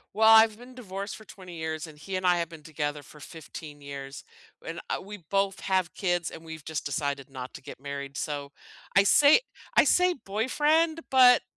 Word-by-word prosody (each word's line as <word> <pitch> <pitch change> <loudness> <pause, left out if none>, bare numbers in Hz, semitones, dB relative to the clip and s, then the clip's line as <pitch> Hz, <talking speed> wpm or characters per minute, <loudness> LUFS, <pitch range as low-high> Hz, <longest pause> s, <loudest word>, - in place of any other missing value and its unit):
Well, 220 +1 +4
I've 220 -1 +7
been 245 +2 -13
divorced 200 -5 -6
for 215 - -13
20 185 -4 -11
years, 160 0 -3
and 155 -2 -13
he 190 +5 -6
and 185 0 -2
I 180 -1 +4
have 170 -1 -2
been 160 -2 -12
together 150 -2 -4
for 150 - -15
15 150 -1 -10
years, 140 -1 -8 0.4
and - - -5
I - - 0
we 205 +2 -9
both 195 -1 +1
have 185 -3 0
kids, 175 -3 -1
and 160 - -10
we've 160 -2 -9
just 160 -2 -3
decided 140 -1 -2
not 130 -1 -8
to - - -10
get 130 - -10
married, 140 0 -6
so, 145 -2 -4 0.5
I 195 - +8
say 285 - +6 0.4
I - - +9
say 360 0 +3
boyfriend, 300 +10 +1
but 255 -2 +7
175 Hz, 195 wpm, -28 LUFS, 145-215 Hz, 0.5 s, I